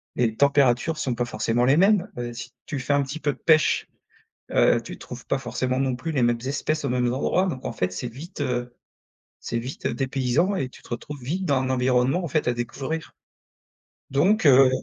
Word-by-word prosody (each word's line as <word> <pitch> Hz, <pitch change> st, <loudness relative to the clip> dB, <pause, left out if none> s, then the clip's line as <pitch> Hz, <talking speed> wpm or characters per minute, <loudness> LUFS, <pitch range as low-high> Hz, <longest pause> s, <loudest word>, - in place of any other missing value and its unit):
les 115 Hz, -3 st, +1 dB
températures 140 Hz, +2 st, +3 dB
sont 130 Hz, -5 st, -1 dB
pas 120 Hz, +1 st, -1 dB
forcément 115 Hz, +1 st, 0 dB
les 135 Hz, +4 st, +4 dB
mêmes, 195 Hz, 0 st, +4 dB
heu, 120 Hz, -1 st, -4 dB
si 120 Hz, +1 st, -8 dB
tu 145 Hz, -, -4 dB
fais 145 Hz, +2 st, 0 dB
un 140 Hz, 0 st, +3 dB
petit 140 Hz, +4 st, -6 dB
peu 145 Hz, -2 st, 0 dB
de -, -, -17 dB
pêche, 155 Hz, -2 st, +3 dB, 0.7 s
heu, -, -, +4 dB
tu -, -, -8 dB
trouves -, -, -10 dB
pas -, -, 0 dB
forcément 130 Hz, 0 st, -2 dB
non 130 Hz, -2 st, 0 dB
plus 160 Hz, +5 st, -4 dB
les 130 Hz, -4 st, +1 dB
mêmes 120 Hz, 0 st, +2 dB
espèces 150 Hz, +2 st, -1 dB
aux -, -, 0 dB
mêmes 125 Hz, -1 st, +1 dB
endroits 185 Hz, +7 st, +1 dB
donc 130 Hz, -7 st, -4 dB
en -, -, -3 dB
fait, 90 Hz, -4 st, -2 dB
c'est 120 Hz, +7 st, -4 dB
vite, 145 Hz, -, -10 dB
heu, 125 Hz, -2 st, -2 dB, 0.7 s
c'est 115 Hz, -, -3 dB
vite 125 Hz, +4 st, -6 dB
dépaysant 135 Hz, +7 st, 0 dB
et 130 Hz, -5 st, -2 dB
tu -, -, -16 dB
te -, -, -17 dB
retrouves 140 Hz, +4 st, -6 dB
vite 180 Hz, +9 st, -2 dB
dans 140 Hz, -5 st, +2 dB
un 130 Hz, -, -2 dB
environnement, 130 Hz, +6 st, +2 dB
en -, -, -2 dB
fait, 150 Hz, -1 st, 0 dB
à 120 Hz, -, +1 dB
découvrir, 135 Hz, +7 st, -4 dB, 1.0 s
donc 175 Hz, +9 st, +2 dB
heu. 135 Hz, -1 st, +7 dB
130 Hz, 210 wpm, -24 LUFS, 120-150 Hz, 1.0 s, heu